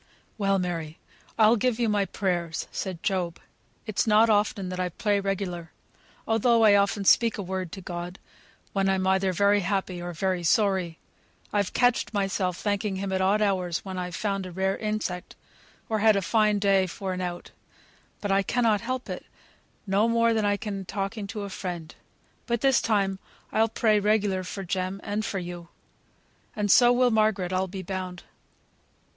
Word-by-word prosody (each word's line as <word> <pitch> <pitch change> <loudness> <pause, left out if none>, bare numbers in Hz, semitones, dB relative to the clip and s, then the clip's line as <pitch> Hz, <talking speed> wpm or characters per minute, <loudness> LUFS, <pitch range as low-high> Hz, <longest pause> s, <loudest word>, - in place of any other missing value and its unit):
"Well, 195 -1 +2
Mary! 165 -4 -3 0.4
I'll 220 +1 +6
give 245 +1 0
you 235 - +2
my 205 -2 +1
prayers," 175 -5 -2
said 185 -4 -5
Job. 180 -4 -1 0.5
"It's 215 +2 -1
not 220 +1 +5
often 205 -3 +1
I 180 0 -1
pray 205 +3 0
regular, 190 -4 -3 0.6
though 225 +1 +3
I 210 -2 +7
often 200 0 +1
speak 230 +3 +4
a 200 - -3
word 185 -2 -4
to 195 - -7
God, 175 +1 -6 0.6
when 195 -1 +1
I'm 190 -1 +1
either 190 0 +2
very 200 +3 +3
happy 190 -1 -2
or 175 0 -5
very 185 +1 -1
sorry; 185 -3 +1 0.6
I've 205 -2 0
catched 245 -3 +2
myself 195 -2 0
thanking 205 -1 -1
Him 195 0 -3
at 190 - 0
odd 200 +3 +3
hours 185 -4 -1
when 190 -1 -5
I've 180 -1 -4
found 195 -3 -2
a - - -8
rare 190 +2 0
insect, 210 -4 -3 0.5
or 220 -1 0
had 215 0 +5
a 200 - 0
fine 215 +1 +2
day 195 -2 +3
for 190 +1 -4
an 185 - -4
out; 175 -1 -5 0.7
but 205 - -2
I 195 0 +4
cannot 225 0 +1
help 255 +2 -3
it, - - -6 0.6
no 200 +3 +2
more 230 0 +3
than 220 -2 +1
I 205 0 +2
can 200 -2 -5
talking 200 +2 -4
to 210 +1 -5
a 200 - -5
friend. 175 -4 -5 0.5
But 235 -1 0
this 270 -2 +4
time 195 -3 +1 0.3
I'll 225 +1 +2
pray 215 -1 +2
regular 205 -2 +1
for 195 +2 -6
Jem, 185 +1 -2
and 210 +1 -2
for 200 - -3
you. 175 -1 -6 0.9
And 205 -2 +1
so 240 +2 +7
will 245 0 +3
Margaret, 215 -4 +1
I'll 185 +1 0
be 190 0 -7
bound. 185 -1 -5
195 Hz, 175 wpm, -26 LUFS, 185-215 Hz, 0.9 s, I